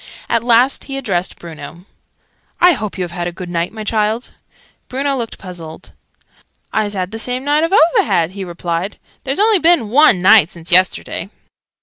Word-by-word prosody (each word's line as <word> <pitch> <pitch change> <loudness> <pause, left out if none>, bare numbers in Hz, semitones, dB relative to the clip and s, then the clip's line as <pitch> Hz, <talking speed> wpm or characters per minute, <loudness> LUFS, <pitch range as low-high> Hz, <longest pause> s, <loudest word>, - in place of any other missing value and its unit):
At 230 -1 0
last 245 +3 +3
he 275 -1 -5
addressed 195 -9 -2
Bruno. 170 +1 -11 0.7
"I 360 0 +6
hope 215 -8 -5
you 185 - -2
have 175 - -6
had 175 0 -4
a - - -3
good 175 +1 -8
night, 170 0 -2
my 220 -1 -7
child?" 215 +2 -1 0.6
Bruno 275 +2 -1
looked 235 -4 -5
puzzled. 175 -4 -10 0.8
"I's 210 -1 -1
had 185 0 -3
the 225 - -6
same 250 +2 -3
night 295 +2 +2
oo've 390 +3 +4
had," 170 - 0
he 195 0 -6
replied. 175 +2 -4 0.3
"There's 270 +1 -2
only 425 -1 +4
been 325 -10 +3
one 260 -5 +5
night 185 -2 +6
since 170 0 -9
yesterday!" 185 +2 +1
210 Hz, 175 wpm, -17 LUFS, 175-265 Hz, 0.8 s, I